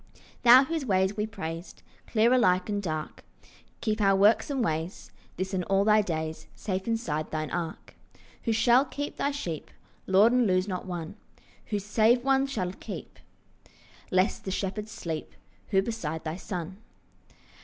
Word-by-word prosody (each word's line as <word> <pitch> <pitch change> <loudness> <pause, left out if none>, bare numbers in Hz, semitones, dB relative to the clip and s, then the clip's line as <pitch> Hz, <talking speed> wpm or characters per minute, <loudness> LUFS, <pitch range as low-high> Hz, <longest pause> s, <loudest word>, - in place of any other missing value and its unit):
Thou 250 +2 +9
whose 320 +1 -2
ways 190 -4 +1
we 210 0 -1
praised, 170 -5 -7 0.2
Clear 230 +2 +3
alike 185 -6 +3
and 205 -1 -1
dark, 155 -5 -4 0.6
Keep 215 -1 -1
our 195 -1 +4
works 205 +9 +4
and 270 -4 0
ways 160 +3 -3 0.3
This 190 +1 -3
and 185 -1 0
all 195 0 +2
thy 215 0 +5
days 160 -4 -4
Safe 190 -1 -3
inside 165 -10 -1
thine 155 -1 -3
ark. 165 -2 -5 0.5
Who 230 - +1
shall 240 +3 +5
keep 290 +1 -5
thy 280 - +1
sheep, 180 - -5 0.4
Lord, 200 +5 +5
and 250 -2 +3
lose 185 0 +2
not 185 -1 -4
one? 175 +1 -5 0.5
Who 210 - -1
save 220 +4 +3
one 270 0 +3
shall 185 -9 -3
keep, - - -9 0.9
Lest 185 +1 +1
the - - -4
shepherds 200 +2 -3
sleep? 160 -2 -5 0.3
Who 195 -2 +2
beside 165 -9 -4
the 160 0 -3
Son? 185 -1 -6
195 Hz, 155 wpm, -28 LUFS, 180-230 Hz, 0.9 s, Thou